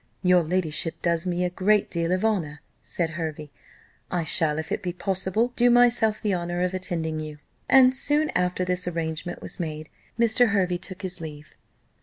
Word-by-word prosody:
"Your 180 -1 +5
ladyship 165 -1 -1
does 170 +1 0
me 180 0 0
a 180 - -1
great 205 +3 +2
deal 170 0 -1
of 185 +3 +1
honour," 165 -9 -1 0.2
said 165 -2 -3
Hervey: 155 -2 -5 0.6
"I 175 -2 -1
shall, 155 -1 +2
if 160 - -5
it - - -1
be 180 -3 -3
possible, 195 +6 -1
do 245 0 +4
myself 240 -3 +3
the 210 -2 +1
honour 175 0 -2
of 180 0 -1
attending 165 -4 -3
you." 155 -1 -7 0.3
And 260 -1 +7
soon 295 +3 +1
after 180 0 0
this 180 0 -1
arrangement 165 0 -4
was - - -6
made, 155 -2 -5 0.3
Mr. 235 +1 +4
Hervey 185 -3 +1
took 185 +1 -7
his 185 -2 -5
leave. 150 -1 -9
180 Hz, 180 wpm, -25 LUFS, 165-200 Hz, 0.6 s, And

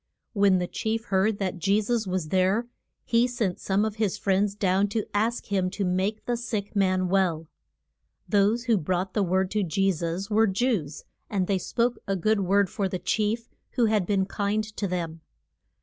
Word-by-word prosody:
When 200 -3 +4
the 180 - 0
chief 225 +5 -3
heard 200 +2 +1
that 190 -2 -3
Je 200 +4 +3
sus 220 0 -1
was 180 -4 -2
there 190 +6 +2 0.4
he 235 +1 +3
sent 225 -7 -2
some 200 +2 +1
of 220 0 -4
his 210 -4 0
friends 200 +1 +1
down 195 0 +2
to 210 +1 -2
ask 225 +3 0
him 185 -2 +1
to 195 +1 -3
make 190 +4 -1
the 240 - 0
sick 220 -3 -4
man 185 -2 +2
well. 175 -4 +1 0.8
Those 210 +3 +2
who 230 -5 +2
brought 185 +3 -2
the 210 - +1
word 190 0 +1
to 210 - +1
Je 195 +2 +1
sus 170 +3 -3
were 220 +1 +3
Jews, 190 - -1 0.3
and 195 -3 0
they 195 0 0
spoke 235 +4 0
a 195 - 0
good 215 +3 +1
word 200 +1 +3
for 195 +2 -2
the 185 - -2
chief, 220 +4 -1 0.3
who 245 -3 +3
had 215 -5 +1
been 195 -2 +2
kind 205 +2 -1
to 200 - -2
them. 165 -3 -4
200 Hz, 190 wpm, -26 LUFS, 185-215 Hz, 0.8 s, When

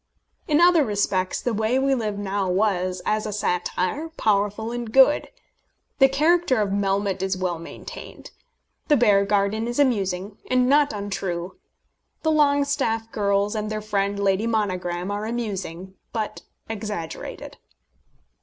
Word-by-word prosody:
In 300 -1 +3
other 345 -2 +6
respects 200 -4 0
The 245 - 0
Way 220 +4 +1
We 270 +1 +2
Live 215 -5 -2
Now 200 -1 -2
was, 185 -2 0
as 215 0 0
a - - -3
satire, 185 - -1
powerful 215 -4 0
and 240 -2 -4
good. 270 +4 +5 0.7
The 270 0 +7
character 305 -1 +3
of 205 -2 +1
Melmotte 195 -1 0
is 190 0 -1
well 180 -3 -2
maintained. 165 - -10 0.6
The 295 - +4
Beargarden 205 0 +2
is 240 - -3
amusing, 200 -7 0
and 255 0 +3
not 290 +2 +4
untrue. 190 -3 -4 0.7
The 315 - +2
Longestaffe 280 -6 +1
girls 200 0 +1
and 215 -1 -3
their 215 0 -2
friend, 200 -1 -1
Lady 200 +2 +1
Monogram, 185 -4 -1
are 205 +1 -3
amusing, 195 -6 -4 0.2
but 220 -2 -4 0.3
exaggerated. 210 -6 -6
210 Hz, 135 wpm, -24 LUFS, 195-240 Hz, 0.7 s, The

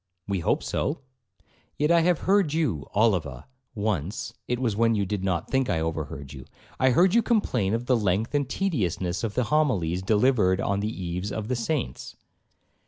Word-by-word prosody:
'We 100 -2 -1
hope 85 - 0
so.' 145 0 -2 0.8
'Yet 150 +2 +2
I 170 - +6
have 175 -1 +2
heard 195 -6 +2
you, 150 - -1
Oliva, 90 - +1 0.3
once 100 -3 -2
(it 125 - 0
was 120 -5 -1
when 115 +1 +3
you 100 -1 0
did 95 0 -3
not 90 -4 -1
think 135 -1 +1
I 80 - +1
overheard 75 -3 -4
you) 65 -2 -10 0.3
I 130 - +4
heard 175 +9 +4
you 235 - +5
complain 125 - +1
of 115 +1 -3
the 125 - +3
length 105 +2 0
and 140 -3 0
tediousness 95 - -1
of 110 -2 -3
the 125 - +2
homilies 110 - +1
delivered 105 -2 +3
on 100 0 0
the 105 +1 -1
eves 90 0 -4
of 110 0 -4
the 125 - +1
saints.' 120 - -3
110 Hz, 180 wpm, -26 LUFS, 90-135 Hz, 0.8 s, I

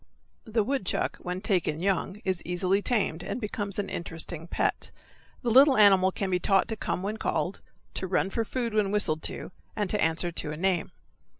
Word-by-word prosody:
The 220 -1 +1
woodchuck, 260 -4 -1
when 180 +1 -5
taken 175 -7 0
young, 195 +2 -1
is 185 -3 -1
easily 180 +3 +1
tamed, 200 -8 0
and 205 +6 -4
becomes 205 -3 -3
an 205 -1 -1
interesting 165 0 -5
pet. - - -1 0.5
The 240 - +1
little 270 +3 +7
animal 195 -3 +6
can 190 0 -3
be 180 - +2
taught 195 +1 +3
to 225 - -2
come 185 -3 -3
when 210 +2 -2
called, 175 -3 -2 0.3
to 190 - -3
run 190 +1 +1
for 230 - 0
food 235 0 -3
when 210 -2 +2
whistled 190 -7 +2
to, - - -7 0.2
and 205 -3 -1
to 210 - 0
answer 165 +2 +1
to 155 -2 -2
a 150 - -5
name. 180 -1 0
195 Hz, 190 wpm, -28 LUFS, 175-210 Hz, 0.5 s, little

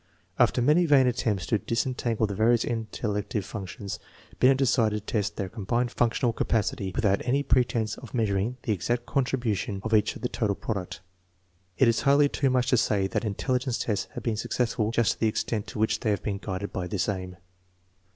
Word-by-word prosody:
After 120 - +3
many 165 +6 +4
vain 140 -3 +6
at 125 -1 +1
tempts 105 -7 0
to 110 - +1
disentangle 115 0 -1
the 105 - -3
various 115 +3 +3
intellective 105 -2 -3
functions, 100 -1 -6 0.4
Binet 130 +1 +5
decided 115 -6 +1
to - - -7
test 105 -2 0
their 100 - -3
combined 120 +4 -1
functional 120 0 +1
capacity 105 -4 -1
without 100 -2 +2
any 135 +3 +1
pretense 115 -5 +1
of 125 - -11
measuring 110 +1 0
the 115 - -1
exact 120 +6 -2
contribution 120 -7 -1
of 110 - -2
each 105 -1 +3
to - - -8
the 125 - -1
total 105 -4 -1
product. 95 -6 -4 0.8
It 130 - +5
is 115 0 +2
hardly 140 +1 +4
too 140 -1 +1
much 125 0 +1
to 125 - +5
say 105 -4 +2
that 95 - -2
intelligence 125 +4 -1
tests 100 -4 -1
have - - -5
been 115 -3 -1
successful 115 -1 -1
just 115 -1 +2
to - - -6
the 110 - +2
extent 110 0 -2
to - - -8
which, 110 +1 +1
they 110 - -1
have 105 - 0
been 100 -2 -2
guided 100 0 -5
by 90 -1 -3
this 100 -1 -1
aim. 95 -3 -4
110 Hz, 195 wpm, -27 LUFS, 100-125 Hz, 0.8 s, vain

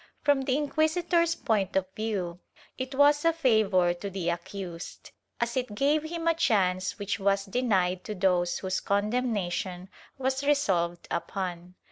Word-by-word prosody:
From 285 -2 +3
the 265 0 +1
inquisitor's 330 +3 +1
point 210 -7 0
of 190 -1 +2
view, 195 -6 -3 0.4
it 260 +1 -5
was 290 +1 +5
a 330 - +5
favor 215 - +3
to 175 +3 -6
the 185 -3 -2
accused, 170 0 -7 0.3
as 235 0 -1
it 250 -5 -2
gave 290 +6 +2
him 330 +1 -4
a 330 - +5
chance 195 - +1
which 205 +1 -3
was 195 0 +1
denied 190 -5 +1
to 215 - -4
those 180 -2 +1
whose 185 -1 -2
condemnation 200 -4 -1 0.3
was 265 +1 -1
resolved 185 -13 +1
upon. 180 -1 -4
205 Hz, 145 wpm, -28 LUFS, 185-275 Hz, 0.4 s, was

